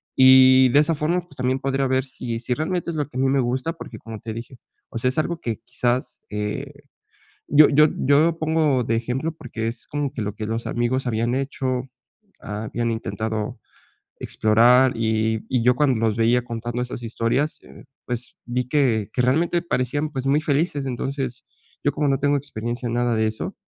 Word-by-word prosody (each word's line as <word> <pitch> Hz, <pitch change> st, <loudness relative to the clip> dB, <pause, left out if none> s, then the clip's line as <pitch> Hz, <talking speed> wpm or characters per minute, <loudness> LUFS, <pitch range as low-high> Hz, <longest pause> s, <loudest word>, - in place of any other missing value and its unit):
Y 130 Hz, 0 st, +7 dB
de 140 Hz, -, +5 dB
esa 150 Hz, +2 st, +2 dB
forma, 155 Hz, +4 st, 0 dB
pues, 170 Hz, -5 st, -19 dB
también 130 Hz, +1 st, 0 dB
podría 135 Hz, 0 st, 0 dB
ver 130 Hz, 0 st, +1 dB
si 125 Hz, -3 st, -5 dB
si 125 Hz, +1 st, -2 dB
realmente 170 Hz, +4 st, -2 dB
es -, -, -6 dB
lo 150 Hz, -, -1 dB
que 130 Hz, -, -8 dB
a -, -, +1 dB
mí 135 Hz, -, +3 dB
me 135 Hz, +1 st, +2 dB
gusta, 130 Hz, +6 st, -1 dB
porque, 165 Hz, -, -10 dB
como 115 Hz, -1 st, -8 dB
te 110 Hz, 0 st, -6 dB
dije, 115 Hz, +3 st, -8 dB, 0.3 s
o -, -, -6 dB
sea, 125 Hz, -, +2 dB
es 130 Hz, -, -4 dB
algo 170 Hz, +2 st, -1 dB
que 115 Hz, -3 st, -3 dB
quizás, 125 Hz, +1 st, -2 dB
eh, 130 Hz, +8 st, -4 dB, 0.7 s
yo 150 Hz, +1 st, +7 dB
yo 150 Hz, +1 st, +6 dB
yo 140 Hz, +2 st, +4 dB
lo 165 Hz, +1 st, +2 dB
pongo 155 Hz, -5 st, +2 dB
de 115 Hz, 0 st, 0 dB
ejemplo 125 Hz, +7 st, -2 dB
porque 115 Hz, -7 st, -5 dB
es 115 Hz, 0 st, -5 dB
como 145 Hz, -2 st, -3 dB
que 130 Hz, -, -6 dB
lo 105 Hz, 0 st, -3 dB
que 110 Hz, 0 st, -5 dB
los 115 Hz, +1 st, -3 dB
amigos 125 Hz, +2 st, -1 dB
habían 115 Hz, +1 st, 0 dB
hecho, 130 Hz, -2 st, -2 dB, 0.6 s
habían 110 Hz, +3 st, -3 dB
intentado 110 Hz, -1 st, -4 dB, 0.6 s
explorar, 120 Hz, +4 st, +4 dB
y 110 Hz, -1 st, 0 dB
y 125 Hz, -3 st, +1 dB
yo 125 Hz, +1 st, +4 dB
cuando 135 Hz, -5 st, +3 dB
los 110 Hz, 0 st, -1 dB
veía 120 Hz, +2 st, +3 dB
contando 120 Hz, 0 st, -4 dB
esas 125 Hz, -1 st, -6 dB
historias, 115 Hz, +6 st, -1 dB
eh, -, -, -15 dB, 0.2 s
pues, 125 Hz, 0 st, -4 dB
vi 125 Hz, 0 st, -2 dB
que 120 Hz, -8 st, +1 dB
que 125 Hz, -, +1 dB
realmente 165 Hz, +7 st, +2 dB
parecían, 145 Hz, 0 st, -1 dB
pues, 130 Hz, -1 st, -3 dB
muy 145 Hz, +3 st, +3 dB
felices. 145 Hz, -1 st, 0 dB
Entonces 130 Hz, 0 st, -3 dB, 0.4 s
yo, 145 Hz, -, +4 dB
como 145 Hz, -1 st, 0 dB
no 135 Hz, -1 st, +1 dB
tengo 145 Hz, +1 st, +2 dB
experiencia 120 Hz, -3 st, -4 dB
en 115 Hz, -, -3 dB
nada 120 Hz, -1 st, +1 dB
de 110 Hz, 0 st, +2 dB
eso, 110 Hz, 0 st, -4 dB
125 Hz, 200 wpm, -23 LUFS, 115-140 Hz, 0.7 s, Y